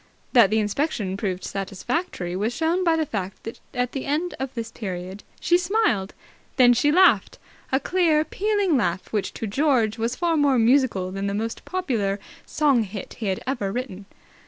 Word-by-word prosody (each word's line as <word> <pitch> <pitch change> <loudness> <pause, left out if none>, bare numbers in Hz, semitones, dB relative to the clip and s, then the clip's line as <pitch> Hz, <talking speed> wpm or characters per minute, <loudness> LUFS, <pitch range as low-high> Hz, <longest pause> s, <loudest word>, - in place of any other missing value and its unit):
That 235 -6 +7
the 215 - +1
inspection 210 -2 -1
proved 190 -2 -3
satisfactory 195 - -3
was 215 +5 -1
shown 335 +5 +1
by 335 -2 +3
the 320 -1 0
fact 195 -7 -5
that 225 - -7
at 250 -1 -1
the 270 - -4
end 310 +5 -1
of 265 -1 -3
this 230 -1 -4
period 185 -2 -6 0.2
she 350 +1 +3
smiled. 345 - 0 0.4
Then 245 -2 +6
she 290 +5 +2
laughed, 370 +4 +4 0.3
a 265 - +3
clear 320 -3 +2
pealing 405 0 +1
laugh 185 -4 -2
which 210 -2 -1
to - - -4
George 230 -2 +1
was 230 +2 -1
far 340 -2 +1
more 285 -3 +3
musical 230 -6 +2
than 195 +1 -3
the 200 - -2
most 225 +2 -4
popular 230 - -1 0.3
song 285 -6 +3
hit 200 -2 -7
he 220 - -3
had 190 -1 -2
ever 240 -7 -2
written. 205 -5 -5
240 Hz, 180 wpm, -24 LUFS, 200-305 Hz, 0.4 s, That